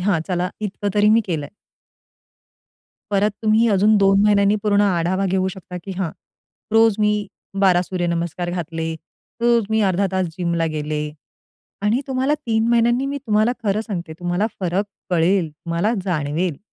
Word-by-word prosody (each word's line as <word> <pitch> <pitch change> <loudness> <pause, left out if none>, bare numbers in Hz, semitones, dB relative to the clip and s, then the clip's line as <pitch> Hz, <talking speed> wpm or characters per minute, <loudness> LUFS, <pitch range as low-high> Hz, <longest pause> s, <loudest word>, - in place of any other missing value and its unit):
"हां, 185 -3 +1
चला 180 0 -1
इतकं 205 0 -3
तरी 210 0 +4
मी 225 +2 +5
केलंय." 150 -5 -3 1.6
परत 205 +1 +2
तुम्ही 220 +2 +3
अजून 205 +2 +4
2 195 0 +4
महिन्यांनी 205 0 +4
पूर्ण 205 -1 +3
आढावा 185 0 +1
घेऊ 190 0 +1
शकता 180 -1 -8
की 195 - -6
"हां, 175 -5 -1 0.6
रोज 225 -1 +5
मी 210 0 +3 0.5
12 180 -2 +4
सूर्यनमस्कार 175 -1 -2
घातले. 165 -2 -3 0.5
रोज 235 -2 +3
मी 220 0 +2
अर्धा 195 +2 +1
तास 185 -1 +1
जिमला 170 -2 0
गेले" 150 0 -2 0.8
आणि 215 +5 +2
तुम्हाला 265 +2 +1
3 225 0 +1
महिन्यांनी 240 +3 +3
मी 285 +1 -3
तुम्हाला 215 +3 +3
खरं 205 +1 +1
सांगते 180 -7 -5
तुम्हाला 175 +4 0
फरक 185 +3 0 0.3
कळेल, 175 0 +2
तुम्हाला 170 +8 -2
जाणवेल. 160 -1 -1
195 Hz, 145 wpm, -21 LUFS, 175-215 Hz, 1.6 s, मी